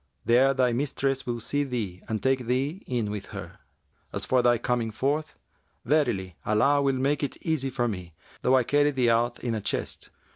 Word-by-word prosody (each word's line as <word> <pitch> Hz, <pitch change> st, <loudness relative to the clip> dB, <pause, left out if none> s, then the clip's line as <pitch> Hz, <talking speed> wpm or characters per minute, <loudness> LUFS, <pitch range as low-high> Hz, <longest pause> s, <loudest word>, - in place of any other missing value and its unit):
There 130 Hz, +3 st, +4 dB
thy 125 Hz, -2 st, +2 dB
mistress 135 Hz, +1 st, -1 dB
will 120 Hz, -1 st, -2 dB
see 145 Hz, +5 st, -1 dB
thee 110 Hz, -9 st, -4 dB
and 110 Hz, -1 st, -2 dB
take 130 Hz, -2 st, +1 dB
thee 135 Hz, +9 st, -1 dB
in 115 Hz, -5 st, -1 dB
with 105 Hz, -2 st, -5 dB
her. -, -, -9 dB, 0.5 s
As -, -, -3 dB
for 130 Hz, -1 st, +3 dB
thy 120 Hz, -1 st, +4 dB
coming 120 Hz, 0 st, -1 dB
forth, 140 Hz, +8 st, -2 dB, 0.5 s
verily 110 Hz, -, +1 dB
Allah 135 Hz, +7 st, +3 dB
will 135 Hz, -1 st, +2 dB
make 140 Hz, +2 st, +1 dB
it 145 Hz, -, -3 dB
easy 155 Hz, -5 st, 0 dB
to 125 Hz, -2 st, 0 dB
me, 90 Hz, -6 st, -6 dB, 0.3 s
though 130 Hz, -, +4 dB
I 130 Hz, -, +4 dB
carry 145 Hz, +4 st, +3 dB
thee 130 Hz, -4 st, +2 dB
out 120 Hz, +1 st, 0 dB
in 120 Hz, -, -1 dB
a 110 Hz, -, -2 dB
chest." -, -, -3 dB
125 Hz, 190 wpm, -27 LUFS, 115-140 Hz, 0.5 s, There